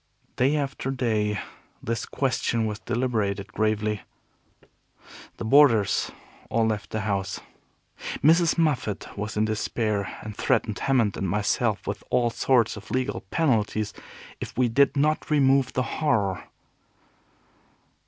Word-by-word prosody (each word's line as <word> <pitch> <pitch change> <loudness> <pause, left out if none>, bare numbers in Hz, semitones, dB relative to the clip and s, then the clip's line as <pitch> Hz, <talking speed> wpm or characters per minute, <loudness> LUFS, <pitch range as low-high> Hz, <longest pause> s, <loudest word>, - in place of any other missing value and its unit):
Day 135 +4 +2
after 135 -2 -2
day 110 -5 0 0.4
this 115 0 -2
question 120 -4 0
was 105 -2 -3
deliberated 115 -4 -2
gravely. 110 -1 0 1.4
The - - -5
boarders 115 -5 +4 0.4
all 115 0 +2
left 110 -2 -2
the 110 - -2
house. 100 -1 -2 0.8
Mrs. 165 +3 +5
Moffat 145 -11 -1
was 105 +1 -4
in 105 - +3
despair, 110 -2 -2
and 110 -1 -7
threatened 110 -4 0
Hammond 125 -7 +1
and 95 - -2
myself 105 +1 0
with 100 +1 -4
all 120 -1 +2
sorts 120 -1 +2
of 105 0 -11
legal 130 +1 -1
penalties 110 -8 +1 0.5
if - - -7
we 125 -1 +3
did 140 +4 +3
not 150 +2 +1
remove 135 -3 +3
the 130 - +1 0.2
Horror. 105 -11 +1
115 Hz, 125 wpm, -25 LUFS, 105-135 Hz, 1.4 s, Mrs